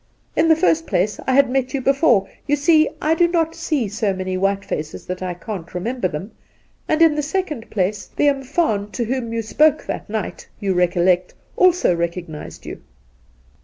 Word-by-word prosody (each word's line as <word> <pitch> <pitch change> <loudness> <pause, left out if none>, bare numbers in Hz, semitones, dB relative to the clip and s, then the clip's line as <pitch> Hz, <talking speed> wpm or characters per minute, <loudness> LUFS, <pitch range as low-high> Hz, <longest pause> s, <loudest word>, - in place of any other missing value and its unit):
In 325 - +3
the 320 - +6
first 325 0 +2
place, 200 +4 0
I 260 - +2
had 275 0 +5
met 255 +1 -1
you 270 - -1
before 265 - +3
— - - -35
you 290 - +3
see, 310 +1 +4
I 310 - +2
do 345 +1 +4
not 330 -2 0
see 305 -8 -1
so 205 -1 -1
many 185 0 -3
white 195 +1 0
faces 150 0 -5
that 180 0 -5
I 180 -1 -3
can't 180 -2 -7
remember 225 +3 -1
them; 180 +6 -6 0.6
and 315 +1 +3
in 325 -2 +5
the 300 - -1
second 300 -6 -3
place, 200 +1 -1
the 295 - 0
umfaan 270 -6 0
to 240 - -1
whom 245 -1 -2
you 230 0 -2
spoke 305 +7 +3
that - - -5
night, 215 0 -4
you 200 -3 0
recol 175 -1 +2
lect, 180 -1 +2 0.2
also 360 - +4
recognised 170 -2 -5
you.' - - -8
235 Hz, 195 wpm, -20 LUFS, 185-300 Hz, 0.6 s, the